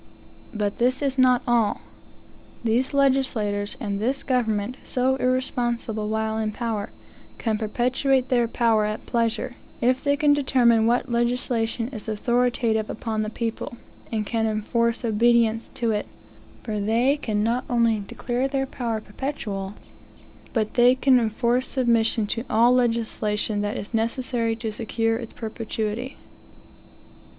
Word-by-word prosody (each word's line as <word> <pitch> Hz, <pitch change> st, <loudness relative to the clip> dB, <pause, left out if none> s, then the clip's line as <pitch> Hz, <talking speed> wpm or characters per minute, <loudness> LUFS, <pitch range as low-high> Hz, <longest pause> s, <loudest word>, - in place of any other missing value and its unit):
But 210 Hz, -4 st, -2 dB
this 255 Hz, +3 st, +2 dB
is 270 Hz, -1 st, 0 dB
not 255 Hz, -1 st, +4 dB
all. 235 Hz, -3 st, +2 dB, 0.8 s
These 235 Hz, +3 st, +1 dB
legislators, 260 Hz, -7 st, +1 dB
and 200 Hz, -1 st, -3 dB
this 260 Hz, +6 st, -1 dB
government, 235 Hz, -2 st, 0 dB
so 260 Hz, +1 st, +1 dB
irresponsible 240 Hz, -4 st, -1 dB
while 220 Hz, 0 st, -1 dB
in 215 Hz, -1 st, -1 dB
power, 220 Hz, -3 st, -3 dB, 0.5 s
can 220 Hz, -2 st, -1 dB
perpetuate 255 Hz, +4 st, +1 dB
their 240 Hz, -2 st, +3 dB
power 225 Hz, -2 st, +2 dB
at 215 Hz, 0 st, -4 dB
pleasure, 230 Hz, 0 st, -1 dB, 0.3 s
if 255 Hz, +2 st, +1 dB
they 285 Hz, 0 st, +2 dB
can 290 Hz, 0 st, +4 dB
determine 240 Hz, -5 st, +3 dB
what 240 Hz, +1 st, +2 dB
legislation 235 Hz, -1 st, 0 dB
is 225 Hz, -6 st, -9 dB
authoritative 235 Hz, 0 st, +1 dB
upon 220 Hz, -1 st, -3 dB
the 215 Hz, -, -2 dB
people, 230 Hz, +1 st, -4 dB, 0.3 s
and 215 Hz, -2 st, -1 dB
can 225 Hz, +1 st, 0 dB
enforce 230 Hz, +3 st, 0 dB
obedience 230 Hz, 0 st, +2 dB
to 235 Hz, -2 st, 0 dB
it, 210 Hz, -1 st, -2 dB, 0.6 s
for 215 Hz, -3 st, -3 dB
they 230 Hz, +7 st, +2 dB
can 215 Hz, -8 st, -1 dB
not 235 Hz, +4 st, 0 dB
only 230 Hz, -3 st, +2 dB
declare 240 Hz, +5 st, -2 dB
their 270 Hz, 0 st, -1 dB
power 235 Hz, -5 st, -3 dB
perpetual, 205 Hz, -5 st, -5 dB, 0.8 s
but 215 Hz, -3 st, -1 dB
they 245 Hz, +1 st, +5 dB
can 260 Hz, -1 st, +4 dB
enforce 235 Hz, +3 st, +1 dB
submission 230 Hz, -3 st, +2 dB
to 230 Hz, +3 st, -2 dB
all 230 Hz, +3 st, +5 dB
legislation 225 Hz, -3 st, 0 dB
that 205 Hz, 0 st, -2 dB
is 205 Hz, -, -7 dB
necessary 230 Hz, 0 st, 0 dB
to 225 Hz, -1 st, -4 dB
secure 225 Hz, +1 st, -1 dB
its 230 Hz, -2 st, -8 dB
perpetuity. 225 Hz, +2 st, -4 dB
230 Hz, 135 wpm, -24 LUFS, 220-250 Hz, 0.8 s, they